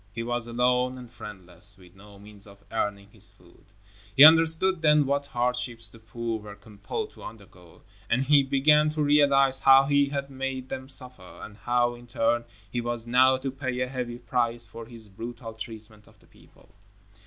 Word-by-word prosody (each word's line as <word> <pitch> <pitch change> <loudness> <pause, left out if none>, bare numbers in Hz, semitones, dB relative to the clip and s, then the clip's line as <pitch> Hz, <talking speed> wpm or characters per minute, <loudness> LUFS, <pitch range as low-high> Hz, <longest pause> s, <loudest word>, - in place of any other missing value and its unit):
He 115 +1 -5
was 120 0 -2
alone 125 +2 0
and 125 -2 -12
friendless, 100 -3 -6
with 90 -2 -18
no 100 +1 -16
means 105 0 -14
of 100 0 -17
earning 100 -2 -3
his 105 -2 -3
food. 85 -2 -22 0.5
He 135 - +10
understood 165 +3 +6
then 150 -2 +4
what 140 +1 -1
hardships 125 -2 -2
the 115 - -15
poor 115 0 -5
were 105 -1 -11
compelled 110 - -7
to - - -17
undergo, 95 -5 -14 0.3
and 130 +3 +1
he 145 +1 +5
began 150 +3 +3
to 150 - +1
realize 140 -2 +3
how 135 0 +6
he 140 0 +2
had 140 -1 -4
made 130 -1 -5
them 130 0 -7
suffer, 125 -9 -1
and 105 - -10
how, 120 +2 0
in 120 0 -14
turn, 120 0 0 0.3
he 120 - -2
was 120 -1 -4
now 130 +2 +4
to 130 +1 -4
pay 130 -2 -4
a 125 - -1
heavy 125 -2 -5
price 120 -1 -1
for 115 0 -11
his 115 -2 -13
brutal 115 +3 -8
treatment 110 -1 -11
of - - -22
the - - -24
people. - - -23
120 Hz, 185 wpm, -26 LUFS, 110-135 Hz, 0.5 s, He